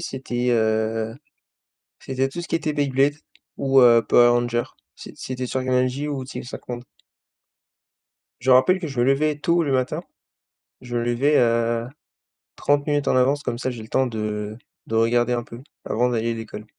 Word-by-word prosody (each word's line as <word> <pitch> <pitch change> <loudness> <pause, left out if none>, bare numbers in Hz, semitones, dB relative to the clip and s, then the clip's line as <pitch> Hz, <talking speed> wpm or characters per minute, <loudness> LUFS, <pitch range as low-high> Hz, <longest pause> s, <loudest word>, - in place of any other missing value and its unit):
c'était, 125 -2 -3
heu, 110 -1 0 0.9
c'était 130 0 -1
tout 175 +6 -6
ce - - -8
qui - - +1
était 155 -2 -1
Beyblade 140 0 +2 0.4
ou 135 -1 +3
heu, 115 -2 +6
Power 120 - +6
Rangers, 120 0 +1 0.3
c'est - - -11
c'était 130 0 -5
sur 130 - -2
Canal 130 0 +2
J 140 +4 -4
ou 135 -2 -3
TV5 125 -1 -7
monde. 120 0 -5 1.6
Je 130 +2 +1
me 125 - +8
rappelle 185 +9 +4
que 175 - -5
je 135 -4 -3
me 120 - +3
levais 145 +3 +2
tôt 170 +3 +1
le 140 -3 -1
matin. 130 -1 0 0.8
Je 120 -1 -4
me 120 - 0
levais, 125 +5 +2
heu, 115 0 +1 0.7
30 145 +1 +1
minutes 145 -2 0
en - - +3
avance, 135 +3 +2
comme 120 - -3
ça, 130 - -2
j'ai 115 -3 -7
le 110 - -13
temps 130 0 +2
de 105 -1 -4 0.3
de 115 - -3
regarder 120 +2 +2
un 120 -1 -1
peu 115 +2 -11 0.2
avant 125 +2 +1
d'aller 115 -1 -1
à - - -1
l'école. 110 -1 -8
125 Hz, 185 wpm, -23 LUFS, 115-135 Hz, 1.6 s, me